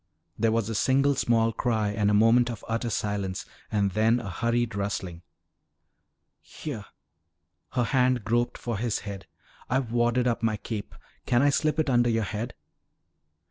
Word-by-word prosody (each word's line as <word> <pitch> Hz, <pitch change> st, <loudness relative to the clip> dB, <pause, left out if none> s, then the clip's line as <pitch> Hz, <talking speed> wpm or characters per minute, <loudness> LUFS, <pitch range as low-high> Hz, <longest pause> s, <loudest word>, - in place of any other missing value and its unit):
There 115 Hz, +1 st, +2 dB
was 115 Hz, -2 st, +1 dB
a 115 Hz, -, -3 dB
single 135 Hz, +6 st, +3 dB
small 115 Hz, -3 st, +2 dB
cry 110 Hz, -3 st, 0 dB
and 105 Hz, 0 st, +1 dB
a -, -, +2 dB
moment 115 Hz, +3 st, +5 dB
of 115 Hz, -, -7 dB
utter 115 Hz, +1 st, -1 dB
silence 100 Hz, -3 st, -2 dB, 0.3 s
and 100 Hz, -2 st, +1 dB
then 110 Hz, +4 st, +3 dB
a 100 Hz, -5 st, -6 dB
hurried 115 Hz, +4 st, 0 dB
rustling. 100 Hz, -4 st, -3 dB, 1.2 s
"Here." 120 Hz, -9 st, -7 dB, 0.9 s
Her 125 Hz, -, +2 dB
hand 125 Hz, -2 st, +2 dB
groped 120 Hz, +1 st, +1 dB
for 115 Hz, -4 st, -4 dB
his 115 Hz, -2 st, -1 dB
head. 100 Hz, -3 st, -7 dB, 0.4 s
"I've 130 Hz, -3 st, 0 dB
wadded 120 Hz, +1 st, +2 dB
up 120 Hz, -2 st, 0 dB
my 110 Hz, -2 st, +1 dB
cape. 105 Hz, 0 st, -6 dB, 0.3 s
Can 120 Hz, +2 st, +3 dB
I 145 Hz, -, +5 dB
slip 155 Hz, +2 st, +1 dB
it 155 Hz, -, +1 dB
under 120 Hz, -2 st, +3 dB
your 115 Hz, -1 st, +1 dB
head?" 110 Hz, +4 st, -4 dB
115 Hz, 160 wpm, -27 LUFS, 105-120 Hz, 1.2 s, moment